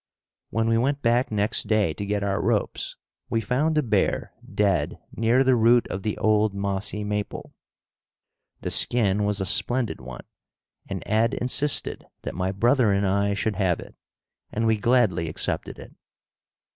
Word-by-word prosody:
When 110 Hz, +1 st, 0 dB
we 115 Hz, 0 st, +2 dB
went 140 Hz, +3 st, -1 dB
back 120 Hz, +2 st, +2 dB
next 105 Hz, 0 st, +1 dB
day 105 Hz, -7 st, +2 dB
to 100 Hz, -, -5 dB
get 100 Hz, 0 st, -1 dB
our 100 Hz, -3 st, -1 dB
ropes 105 Hz, +2 st, -1 dB, 0.3 s
we 115 Hz, -, +1 dB
found 130 Hz, +9 st, 0 dB
the 150 Hz, -, +2 dB
bear 120 Hz, -, 0 dB, 0.2 s
dead 100 Hz, -4 st, 0 dB, 0.2 s
near 115 Hz, +4 st, +3 dB
the 130 Hz, -1 st, +4 dB
root 120 Hz, +1 st, +4 dB
of 95 Hz, -, -4 dB
the 105 Hz, +1 st, -3 dB
old 110 Hz, -1 st, +2 dB
mossy 100 Hz, +1 st, -2 dB
maple. 105 Hz, 0 st, -4 dB, 1.1 s
The -, -, -4 dB
skin 105 Hz, -4 st, +3 dB
was 105 Hz, 0 st, -1 dB
a 95 Hz, -, -1 dB
splendid 120 Hz, -, +1 dB
one, 65 Hz, -1 st, -9 dB, 0.6 s
and -, -, -4 dB
Ed 115 Hz, +4 st, +1 dB
insisted 140 Hz, +4 st, +1 dB, 0.2 s
that -, -, -5 dB
my 95 Hz, +1 st, -2 dB
brother 120 Hz, +3 st, +2 dB
and 100 Hz, 0 st, +1 dB
I 100 Hz, +1 st, +1 dB
should 105 Hz, 0 st, -2 dB
have 95 Hz, -4 st, +1 dB
it, -, -, -11 dB, 0.6 s
and 115 Hz, +1 st, -1 dB
we 110 Hz, 0 st, +3 dB
gladly 105 Hz, -9 st, +2 dB
accepted -, -, -2 dB
it. -, -, -12 dB
105 Hz, 160 wpm, -24 LUFS, 100-120 Hz, 1.1 s, the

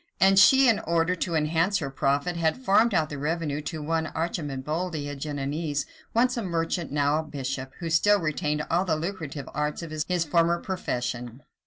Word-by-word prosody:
and 195 Hz, +1 st, +6 dB
she, 265 Hz, +7 st, +7 dB
in 225 Hz, -3 st, +4 dB
order 170 Hz, -2 st, +1 dB
to 170 Hz, -1 st, -2 dB
enhance 165 Hz, +5 st, +2 dB
her 140 Hz, -7 st, -4 dB
profit, 140 Hz, +6 st, 0 dB
had 165 Hz, +2 st, +1 dB
farmed 230 Hz, -1 st, +3 dB
out 160 Hz, -5 st, +1 dB
the 145 Hz, -, -5 dB
revenue 150 Hz, -1 st, -2 dB
to 155 Hz, 0 st, -5 dB
one 160 Hz, +1 st, 0 dB
Arcemboldi, 155 Hz, 0 st, -3 dB
a 145 Hz, -, -5 dB
Genoese, 145 Hz, +1 st, -3 dB, 0.3 s
once 245 Hz, +2 st, +2 dB
a 235 Hz, -, -2 dB
merchant, 170 Hz, -3 st, -2 dB
now 145 Hz, +1 st, +2 dB
a -, -, -2 dB
bishop, 135 Hz, -3 st, -5 dB
who 170 Hz, -, -5 dB
still 205 Hz, +5 st, +4 dB
retained 150 Hz, -2 st, -1 dB
all 175 Hz, +3 st, +3 dB
the 170 Hz, -4 st, 0 dB
lucrative 155 Hz, -4 st, -5 dB
arts 150 Hz, +3 st, -2 dB
of 165 Hz, -, -7 dB
his 155 Hz, -1 st, -2 dB, 0.2 s
former 170 Hz, +2 st, +2 dB
profession. 125 Hz, -, -4 dB
160 Hz, 180 wpm, -26 LUFS, 145-175 Hz, 0.3 s, she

